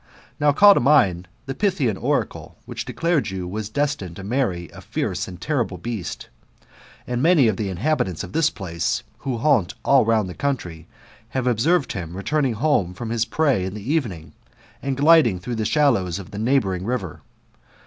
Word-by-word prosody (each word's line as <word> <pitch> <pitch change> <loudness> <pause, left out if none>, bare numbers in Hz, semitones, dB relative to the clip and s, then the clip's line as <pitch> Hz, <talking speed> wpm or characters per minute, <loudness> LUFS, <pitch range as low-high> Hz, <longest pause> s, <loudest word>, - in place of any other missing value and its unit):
Now 145 0 +4
call 200 +8 +7
to - - +2
mind 100 - +3 0.2
the 135 - -4
Pythian 150 - 0
oracle, - - -2
which - - -6
declared 165 -7 0
you 95 -2 -5
were 105 +5 -3
destined 110 - -2
to 95 - -8
marry 100 -6 -1
a - - -12
fierce - - -3
and 90 -2 -9
terrible 120 -10 -1
beast; 110 0 -5 0.8
and 125 0 -2
many 160 -5 +5
of 110 - +1
the 100 0 -3
inhabitants 95 - -1
of - - -9
this 160 0 +3
place, 85 - -3 0.2
who 130 -3 -3
haunt 125 - +2
all 140 -2 +5
round 110 -3 +2
the 90 - -6
country, 90 - -3 0.4
have 130 -1 -2
observed 135 +7 +2
liim 85 -3 -5
returning 135 +6 0
home 105 - +1
from 115 +3 -5
his 115 -1 +1
prey 140 -11 +1
in 95 +2 -4
the 105 +8 -3
evening, 100 - -3 0.5
and 135 -1 -2
gliding 145 - +5
through 120 +7 -5
the 110 -2 -2
shallows 115 - +2
of 100 -3 -9
the 100 - -6
neighbouring 110 -7 +1
river. 100 -7 -3
115 Hz, 180 wpm, -22 LUFS, 95-140 Hz, 0.8 s, call